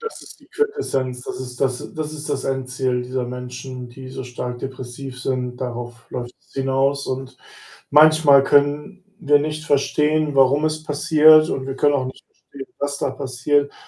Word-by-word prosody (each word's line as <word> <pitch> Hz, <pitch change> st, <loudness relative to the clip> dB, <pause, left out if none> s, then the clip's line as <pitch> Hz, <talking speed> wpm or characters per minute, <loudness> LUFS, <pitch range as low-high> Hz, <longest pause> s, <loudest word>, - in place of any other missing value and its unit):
Das 455 Hz, 0 st, -7 dB
ist -, -, -14 dB
die -, -, -21 dB
Quintessenz, 135 Hz, -, -2 dB
das 130 Hz, -, -6 dB
ist 125 Hz, -1 st, -8 dB
das 130 Hz, -2 st, -2 dB
das 155 Hz, -1 st, -4 dB
ist 150 Hz, -1 st, -7 dB
das 140 Hz, -2 st, -2 dB
Endziel 130 Hz, -1 st, -1 dB
dieser 125 Hz, 0 st, -3 dB
Menschen, 125 Hz, 0 st, -7 dB
die 130 Hz, +2 st, -11 dB
so 130 Hz, 0 st, -7 dB
stark 125 Hz, 0 st, -5 dB
depressiv 130 Hz, 0 st, -7 dB
sind, 125 Hz, -1 st, -2 dB
darauf 120 Hz, -2 st, -6 dB
läuft's 120 Hz, 0 st, -8 dB
hinaus 135 Hz, +1 st, 0 dB
und 130 Hz, 0 st, -5 dB, 0.5 s
manchmal 150 Hz, -2 st, +7 dB
können 145 Hz, +7 st, +1 dB, 0.2 s
wir 145 Hz, -3 st, +4 dB
nicht 155 Hz, +1 st, -3 dB
verstehen, 150 Hz, +1 st, +1 dB
warum 135 Hz, +3 st, +4 dB
es 155 Hz, 0 st, -1 dB
passiert 155 Hz, +1 st, +5 dB
und 130 Hz, -, -3 dB
wir 135 Hz, 0 st, -4 dB
können 145 Hz, +1 st, +3 dB
auch 130 Hz, -2 st, 0 dB
nicht 130 Hz, -, -9 dB
verstehen, 135 Hz, -1 st, -12 dB
was 145 Hz, 0 st, -2 dB
da 140 Hz, -, -1 dB
passiert 135 Hz, +2 st, 0 dB
135 Hz, 170 wpm, -21 LUFS, 125-150 Hz, 0.5 s, manchmal